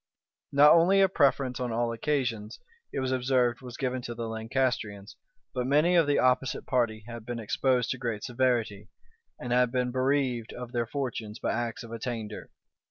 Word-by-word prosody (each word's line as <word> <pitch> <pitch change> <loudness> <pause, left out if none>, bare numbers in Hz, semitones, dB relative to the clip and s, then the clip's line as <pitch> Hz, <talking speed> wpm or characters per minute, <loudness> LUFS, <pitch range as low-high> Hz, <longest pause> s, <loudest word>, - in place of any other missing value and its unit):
Not 145 +2 +7
only 175 +4 +5
a 195 - +6
preference 140 -7 +1
on 125 -2 -2
all 115 +1 0
occasions, 115 -4 -2 0.3
it 135 - -2
was 130 0 -1
observed, 125 -1 +1
was 125 -2 -9
given 130 -1 -2
to 120 -1 -6
the 115 -1 -4
Lancastrians, 110 -3 -2 0.4
but 125 -1 -2
many 150 +6 +3
of 165 -4 +4
the 145 - +2
opposite 130 0 +1
party 115 -4 0
had 120 -1 -8
been 120 +1 -5
exposed 125 +3 0
to 130 - -4
great 115 -5 -3
severity, 120 -5 0 0.5
and 120 0 -3
had 125 -1 +3
been 125 -1 0
bereaved 130 -3 0
of 125 -1 -7
their 120 -2 -1
fortunes 115 -5 -4
by - - -2
acts 120 0 -3
of 115 - -11
attainder. 115 -2 -5
125 Hz, 175 wpm, -28 LUFS, 115-130 Hz, 0.5 s, Not